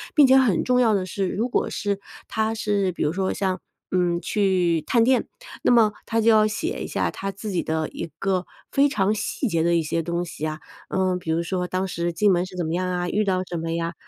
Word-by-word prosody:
并 295 -3 +8
且 265 0 +6
很 235 -10 +3
重 250 0 +2
要 225 -3 +4
的 190 -2 0
是， 195 +1 -2
如 230 +7 -1
果 - - 0
是 200 -1 -2 0.3
他 220 0 0
是 205 -4 0
比 - - -2
如 150 - +1
说 190 +1 -1
像， 190 -2 -1 0.3
嗯， 175 -2 +1
去 185 -6 +1
探 235 -2 +4
店， 255 +1 +2 0.4
那 - - +4
么 230 -3 +5
他 225 - 0
就 230 +1 +5
要 215 -1 +5
写 320 - -3
一 - - -5
下 - - -1
他 195 - -4
自 205 +2 -6
己 180 - 0
的 160 0 -2
一 - - -6
个 190 -2 0 0.3
非 280 +1 +4
常 205 -5 +1
细 235 +5 -2
节 165 -3 +1
的 170 +1 +2
一 165 - +2
些 165 +2 -1
东 170 +1 -2
西 160 -2 -9
呀。 155 0 -3 0.3
嗯， 185 -1 0
比 170 -2 -8
如 165 +1 +1
说， 180 +1 -2
当 185 +1 -1
时 170 -1 -2
进 200 +4 +3
门 175 0 +2
是 185 0 -11
怎 175 - -2
么 160 - -2
样 185 +1 0
啊， 175 -1 -1
遇 215 +3 +1
到 185 -1 +1
什 175 -1 -5
么 165 0 -3
呀？ 170 0 -2
185 Hz, 265 characters per minute, -24 LUFS, 170-215 Hz, 0.4 s, 并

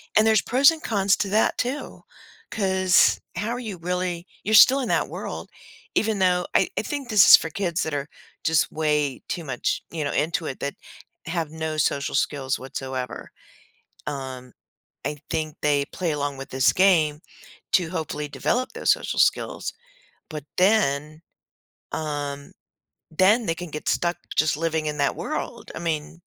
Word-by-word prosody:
And 215 - +5
there's 220 -2 +4
pros 275 +5 +5
and 325 -1 -7
cons 200 -2 +2
to 200 - -1
that 215 +3 +2
too 255 +4 -4 0.5
'cause 190 -3 +3 0.2
how 210 - -2
are 245 +1 -2
you 215 -6 -6
really 180 0 -3 0.2
you're 215 +2 +2
still 265 +5 +8
in 255 - -2
that - - +1
world - - -6 0.5
even 220 -2 +1
though 180 -1 +2
I - - +4
I - - +2
think 280 0 -5
this 210 -5 +7
is - - +12
for 165 - -1
kids 175 0 -1
that 160 - -3
are 145 0 -2 0.4
just 160 -1 +2
way 150 -3 0
too 170 - -4
much, 130 -5 -2
you 160 -2 -3
know, 145 - -2
into 165 +2 0
it 135 - -5
that 140 - -3 0.5
have 165 -2 -3
no 160 -1 -4
social 140 -2 0
skills 135 -2 0
whatsoever, 130 -1 -6 0.8
um, 130 -3 -6 0.5
I 150 - -3
think 155 -2 -2
they 145 -1 +2
play 175 +2 -3
along 145 -1 -2
with 135 0 -9
this 130 0 +3
game 160 -6 +3 0.5
to 175 -3 +3
hopefully 155 -3 -4
develop 250 - -1
those - - 0
social - - -3
skills, - - +1 0.6
but 150 -3 -6
then 155 -6 +2 0.7
um, 145 -2 -4 0.6
then 200 +8 +3
they 165 - 0
can 175 0 -8
get 150 0 -5
stuck 175 0 +1 0.2
just 155 -1 +3
living 160 -1 -1
in 150 -1 -3
that 140 - +1
world - - -5
I - - -5
mean 165 0 -3
160 Hz, 165 wpm, -24 LUFS, 145-190 Hz, 0.8 s, is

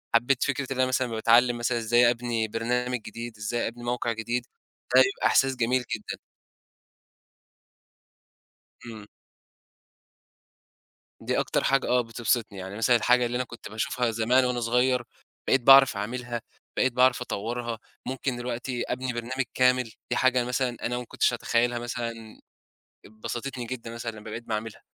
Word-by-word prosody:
حبّيت 120 +2 +3
فكرة 140 -1 -1
إن - - -8
أنا 130 - +5
مثلًا 130 -1 0
باتعلّم 120 +2 +3
مثلًا 120 0 0
إزاي 120 +1 +4
أبني 120 -2 -1
برنامج 125 +3 -1
جديد، 115 0 -8
إزاي 110 +3 -2
أبني 120 +1 -8
موقِع 120 0 -1
جديد، 120 +2 -2 0.5
ده 130 - +9
بيبقى 130 0 +2
إحساس 135 0 +3
جميل 125 +1 +1
جدًا. 105 - -7 2.7
امم. 110 -3 -9 2.1
دي - - 0
أكتر - - 0
حاجة 135 0 +2
آه 125 0 +3
بتبسِطني، 115 -2 -1
يعني 95 +1 -7
مثلًا 120 +2 +4
الحاجة 125 +2 +3
اللي 120 +1 -3
أنا 125 - 0
كنت 120 -1 -11
باشوفها 115 +3 -1
زمان 120 +4 +3
وأنا 125 -1 -1
صغيّر 125 +2 +2 0.4
بقيت 135 - +3
باعرَف 135 -2 +7
أعملها، 120 +2 -4 0.4
بقيت 130 -1 +2
باعرَف 125 0 +4
أطوّرها، 115 +1 -4 0.3
ممكن 130 -1 -3
دلوقتي 120 0 -3
أبني 130 -1 -2
برنامج 125 +3 -3
كامل، 125 -2 +2 0.2
دي 120 - +2
حاجة 130 -1 +3
مثلًا 125 -1 -1
أنا 120 +1 -1
ما 125 - -5
كنتش - - +1
أتخيّلها 120 0 0
مثلًا، 120 -1 -4 1.0
بسَطتني 120 +3 -5
جدًا 115 -1 -6
مثلًا 115 0 -4
لما 110 0 -10
بقيت 115 +2 -6
باعملها. 110 0 -4
120 Hz, 145 wpm, -26 LUFS, 115-125 Hz, 2.7 s, ده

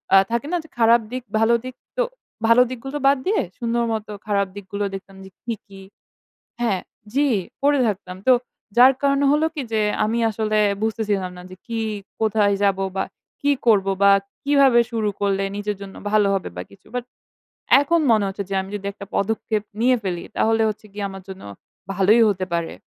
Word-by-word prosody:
আ - - +10
থাকে 235 +4 -1
না 355 - +2
যে 320 - -17
খারাপ 230 0 +5
দিক 255 0 -4 0.2
ভালো 225 +1 +4
দিক? 255 0 -7 0.2
তো - - +3 0.4
ভালো 230 +2 +6
দিকগুলো 270 +3 -5
বাদ 280 +1 +5
দিয়ে 420 +2 +2 0.2
সুন্দর 235 0 0
মতো 215 -1 -4 0.2
খারাপ 200 -1 +1
দিকগুলো 200 +1 -4
দেখতাম 195 0 -10
যে - - -11
কী, 235 - -2
কী 195 -1 -13 0.8
হ্যাঁ 215 -6 +1 0.3
জি 285 +3 +2 0.4
পড়ে 285 0 +4
থাকতাম। 185 -3 -4
তো 260 - +7 0.4
যার 255 +2 +8
কারণে 280 0 +2
হল 300 +1 +2
কি 295 - -3
যে 220 - +2 0.2
আমি 225 +2 0
আসলে 215 0 0 0.2
বুঝতেছিলাম 210 -4 -1
না 180 - -10
যে 185 - -10
কি 230 -2 -3 0.4
কোথায় 215 -2 +2
যাব? 195 -1 +2 0.2
বা 190 - +1 0.4
কি 285 - +3 0.2
করব 205 -4 +4 0.2
বা 200 - +7 0.3
কিভাবে 275 -4 +5
শুরু 225 -3 -1
করলে 195 -1 +1
নিজের 205 0 -3
জন্য 195 -1 -9 0.2
ভালো 210 -1 +4
হবে 195 - -2
বা - - -3
কিছু? 195 -1 -19
বাট 250 -1 -2 0.8
এখন 335 +4 +2
মনে 215 -2 +4
হচ্ছে 195 +1 -4
যে - - -3
আমি 190 - -9
যদি 200 -1 -6
একটা 200 0 -9
পদক্ষেপ 215 0 -1 0.2
নিয়ে 255 +2 +5
ফেলি 180 -3 -3
তাহলে 225 0 +2
হচ্ছে 215 0 -7
গিয়ে 205 0 -3
আমার 195 -1 -9
জন্য 190 0 -9 0.5
ভালোই 200 +5 +4
হতে 190 -2 -1
পারে। 170 -1 -1
215 Hz, 185 wpm, -22 LUFS, 200-240 Hz, 0.8 s, আ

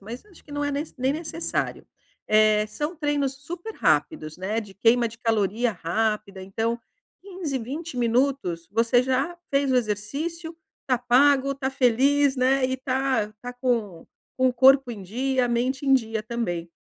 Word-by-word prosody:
mas 230 - -9
acho 385 -5 -20
que 290 - -13
não 290 0 -2
é 285 - -1
nes 290 +3 -4
nem 260 +2 +1
necessário. 325 +1 -3 0.4
Eh, 215 0 +4
são 295 +10 -4
treinos 290 -4 -1
super-rápidos, 335 - -1
né, 205 +5 -2
de 200 -3 -11
queima 235 +3 +3
de 230 - -14
caloria 225 0 +1
rápida, 205 +3 -2
então 225 +5 -2 0.4
15, 360 -8 -4
20 280 +5 -6
minutos, 235 -8 0
você 230 +3 +3
já 265 +7 -1
fez 275 -2 +2
o - - +3
exercício, 280 +10 -3 0.3
tá 255 -2 +2
pago, 270 +3 +3
tá 270 -1 -2
feliz, 270 +2 +3
né, 260 +1 +2
e 260 0 0
tá 260 -4 -1
tá 245 0 -6
com 235 -9 -2 0.3
com 260 0 +3
o - - 0
corpo 265 +1 +5
em 220 -4 -7
dia, 255 +6 0
a - - -5
mente 255 +3 -1
em 270 - +6
dia 225 -4 0
também. 215 -8 -3
255 Hz, 165 wpm, -25 LUFS, 220-275 Hz, 0.4 s, em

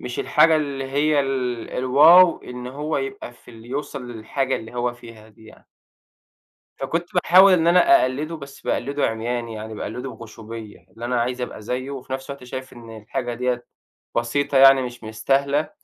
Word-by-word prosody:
مش 125 -1 -6
الحاجة 160 +1 +4
اللي 140 -3 -3
هي 145 +2 +1
ال 125 -4 -3
الواو 160 +8 +6
إن 125 0 -8
هو 150 +4 -3
يبقى 135 -2 -5
في 120 - -18
اللي 115 0 -14
يوصل 135 -2 -5
للحاجة 130 +4 -2
اللي 110 +2 -10
هو 120 0 -1
فيها 115 -2 -14
دي 110 0 -20
يعني. - - -17 1.1
فكنت 165 +6 -2
باحاول 185 +2 +6
إن 165 -2 +2
أنا 175 +1 +6
أقلِّدُه 150 +6 -2
بس 140 -1 -12
باقلِّدُه 140 +3 -1
عمياني، 115 +1 -3
يعني 110 0 -7
باقلِّدُه 125 +5 -5
بغُشومية، 110 -4 -10
إن 115 - -9
أنا 120 -1 0
عايز 125 +1 -2
أبقى 120 - -6
زيه، 125 +5 -4
وفي 130 -1 -7
نفس 135 +1 -6
الوقت 140 -2 -8
شايف 130 +1 -8
إن 115 -2 -11
الحاجة 120 +3 -4
ديَّة 125 0 -2 0.5
بسيطة 135 +4 0
يعني 135 0 +7
مش 120 -1 -7
مستاهلة 140 +7 0
125 Hz, 170 wpm, -22 LUFS, 120-140 Hz, 1.1 s, يعني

